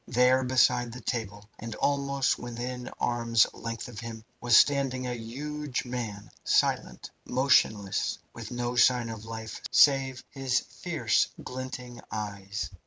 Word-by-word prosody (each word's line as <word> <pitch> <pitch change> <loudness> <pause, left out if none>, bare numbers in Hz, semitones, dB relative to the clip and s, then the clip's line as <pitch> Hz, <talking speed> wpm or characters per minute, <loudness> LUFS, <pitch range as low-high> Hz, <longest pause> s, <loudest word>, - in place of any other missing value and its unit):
There, 125 +2 +4
beside 125 -1 +3
the 125 - -8
table, 105 -4 -4
and 115 -1 -6
almost 140 0 +1
within 125 +1 -5
arm's 115 -2 +3
length 115 0 -5
of 120 -3 -8
him, 115 -2 -7 0.2
was 120 -2 +6
standing 135 -3 +3
a 125 - -2
huge 135 +5 -4
man, 115 -5 -5
silent, - - +1
motionless, 125 -7 +2 0.2
with - - -8
no 120 0 -2
sign 125 -1 +4
of 110 -1 -7
life 110 -1 -7
save 135 -2 +4
his 135 -2 0
fierce - - 0 0.2
glinting 125 -1 -6
eyes. 100 -3 -4
120 Hz, 130 wpm, -28 LUFS, 115-130 Hz, 0.2 s, was